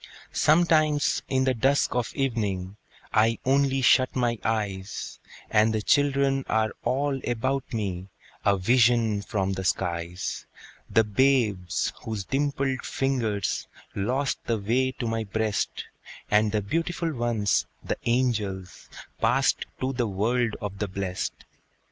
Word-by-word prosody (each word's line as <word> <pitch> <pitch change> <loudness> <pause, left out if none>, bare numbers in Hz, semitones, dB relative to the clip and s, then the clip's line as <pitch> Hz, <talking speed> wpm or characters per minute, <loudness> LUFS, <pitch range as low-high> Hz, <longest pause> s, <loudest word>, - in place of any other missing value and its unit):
Sometimes, 155 -2 +3
in 130 -1 +2
the 130 -1 +2
dusk 135 +4 +2
of 125 -1 -1
evening, 105 -8 -1 0.4
I 115 +1 +3
only 135 0 +2
shut 130 +1 +4
my 120 -3 0
eyes, 105 -3 -3 0.3
And 110 0 +3
the 110 - -1
children 140 0 +2
are 110 -1 +2
all 135 +2 0
about 130 +3 -1
me, 95 -5 -3 0.4
A 100 -1 +3
vision 115 0 +3
from 95 -2 -1
the 95 0 -4
skies: 90 0 -2 0.4
The 115 - +4
babes 105 -5 +1
whose 110 -3 -3
dimpled 135 0 -1
fingers 115 -8 -1 0.3
Lost 130 +8 -1
the 115 - +1
way 120 +6 +1
to 120 - -5
my 115 0 -1
breast, 110 0 -2 0.5
And 105 0 +4
the 105 -1 0
beautiful 165 - -1
ones, 115 -5 +1 0.2
the - - -3
angels, 110 -7 -1 0.3
Passed - - +2
to 130 +1 0
the 120 -2 0
world 110 +3 0
of 100 -1 -5
the 105 - -1
blest. 95 -1 -4
115 Hz, 130 wpm, -26 LUFS, 100-130 Hz, 0.5 s, shut